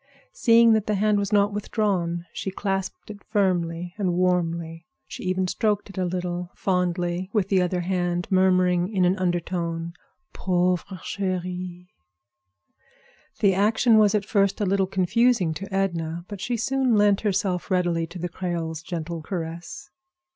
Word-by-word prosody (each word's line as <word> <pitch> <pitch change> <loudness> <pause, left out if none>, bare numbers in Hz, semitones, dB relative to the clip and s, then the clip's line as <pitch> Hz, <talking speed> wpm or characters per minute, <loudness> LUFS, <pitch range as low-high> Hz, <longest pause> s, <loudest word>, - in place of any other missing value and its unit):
Seeing 230 - +5
that 215 -2 +1
the 210 - +1
hand 210 +1 +2
was 200 0 -2
not 205 0 +3
withdrawn, 190 -5 -1
she - - -4
clasped 195 +1 -3
it 205 -1 -12
firmly 175 -4 0
and 185 -3 +1
warmly. 170 -2 -1 0.2
She - - -9
even 185 0 0
stroked 210 0 -1
it 195 - -15
a 185 - +1
little, 180 0 -3
fondly, 180 -1 -1
with 200 -4 +1
the 190 -2 +3
other 180 0 0
hand, 175 -1 -1
murmuring 185 -1 +3
in 190 -4 +2
an 180 +2 +3
undertone, 170 -2 -2 0.4
"Pauvre 180 0 0
chérie." 180 -2 -4 1.5
The 200 -2 +5
action 220 +3 +4
was 210 0 +4
at 205 -1 0
first 200 -2 +1
a 205 - +1
little 195 0 +1
confusing 195 0 +2
to 195 +5 -7
Edna, 170 -3 -2
but 205 -3 -8
she 240 -1 -1
soon 260 +1 +1
lent 205 -1 +4
herself 195 -3 -1
readily 175 -3 +1
to 180 - -10
the 175 0 -3
Creole's 170 -3 -4
gentle 170 -1 -5
caress. 170 - -6
185 Hz, 150 wpm, -24 LUFS, 175-200 Hz, 1.5 s, Seeing